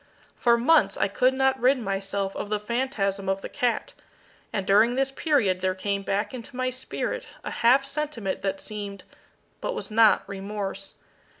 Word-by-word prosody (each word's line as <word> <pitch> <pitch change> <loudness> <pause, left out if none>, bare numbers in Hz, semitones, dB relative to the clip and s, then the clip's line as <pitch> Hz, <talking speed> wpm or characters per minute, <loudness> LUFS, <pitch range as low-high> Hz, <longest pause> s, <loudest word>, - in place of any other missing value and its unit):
For 235 -1 +3
months 300 +7 +4
I - - +2
could 255 +6 +2
not 265 0 +2
rid 255 +3 +4
myself 195 -2 -2
of 205 - -4
the 210 0 0
phantasm 210 -4 -1
of 195 0 0
the - - -5
cat, 240 -2 -1 0.6
and 195 -2 -2
during 220 +5 +4
this 270 +1 +1
period 255 - +1
there 185 0 0
came 200 +1 -2
back 200 +4 -2
into 250 0 -8
my 255 0 -1
spirit 260 - -3 0.2
a - - -4
half 255 +4 +4
sentiment 275 -9 -3
that 195 0 -2
seemed, 205 -2 -6 0.6
but - - -2
was 350 - -6
not, 220 -1 +5
remorse. 200 0 -5
215 Hz, 170 wpm, -26 LUFS, 195-260 Hz, 0.6 s, not